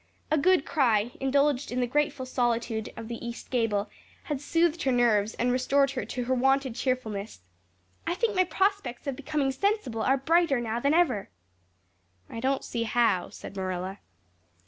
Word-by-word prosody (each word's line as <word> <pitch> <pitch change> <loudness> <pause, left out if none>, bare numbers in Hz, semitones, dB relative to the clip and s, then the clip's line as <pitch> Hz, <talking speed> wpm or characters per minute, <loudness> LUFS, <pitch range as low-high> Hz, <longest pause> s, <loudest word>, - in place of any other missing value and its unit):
A 310 - +4
good 365 0 +3
cry, 235 -6 +2
indulged 280 0 +1
in 250 - -1
the 250 - +2
grateful 280 +1 0
solitude 235 -3 -1
of 230 -1 -7
the 235 0 -6
east 235 0 -7
gable, 225 -5 +1 0.4
had 290 -3 -3
soothed 335 +2 +1
her 265 - +1
nerves 225 -4 +2
and 245 +1 +1
restored 275 +2 +2
her 260 -2 -3
to 250 - -4
her 255 +2 0
wonted 270 0 +2
cheerfulness. 225 - -3 0.7
"I 345 - 0
think 440 +1 0
my 370 0 +4
prospects 380 -11 -1
of 275 -2 -2
becoming 285 0 -1
sensible 270 - -1
are 265 +4 +3
brighter 320 0 +2
now 230 -1 -2
than 280 +5 +2
ever." 270 - +2 1.0
"I 230 - -5
don't 265 +3 0
see 235 - -3
how," 230 -5 +2
said - - -10
Marilla. 185 0 -4
255 Hz, 170 wpm, -28 LUFS, 230-285 Hz, 1.0 s, A